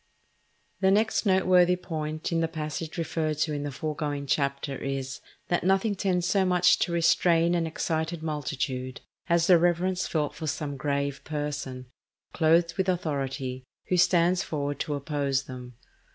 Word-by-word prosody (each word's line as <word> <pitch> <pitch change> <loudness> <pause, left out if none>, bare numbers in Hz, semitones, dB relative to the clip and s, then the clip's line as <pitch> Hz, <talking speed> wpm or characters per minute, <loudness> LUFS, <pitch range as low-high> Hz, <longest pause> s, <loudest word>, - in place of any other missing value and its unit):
The 190 - +3
next 215 +2 +2
noteworthy 185 -1 +4
point 155 -3 -4
in 165 - +1
the 165 - +1
passage 155 0 -5
referred 160 -2 -1
to 155 0 0
in 145 - -2
the 145 0 -4
foregoing 145 0 -3
Chapter 140 0 -1
is, 135 0 -4 0.3
that 175 - +1
nothing 195 +3 +2
tends 185 -3 0
so 195 0 +2
much 180 -1 +4
to - - 0
restrain 170 0 +3
an 170 -2 +1
excited 160 0 -2
multitude 130 -4 -3 0.3
as 170 -1 +3
the 175 -2 +6
reverence 175 +2 +1
felt 150 -3 -1
for 155 - -6
some 145 -1 -3
grave 140 0 -2
person, 145 -4 -4 0.5
clothed 165 +1 +3
with 190 -1 +1
authority, 135 -7 -2 0.3
who 180 - +2
stands 180 0 +4
forward 145 -4 -3
to 150 -3 -2
oppose 140 -2 -1
them. 125 -2 -9
160 Hz, 150 wpm, -27 LUFS, 140-175 Hz, 0.5 s, the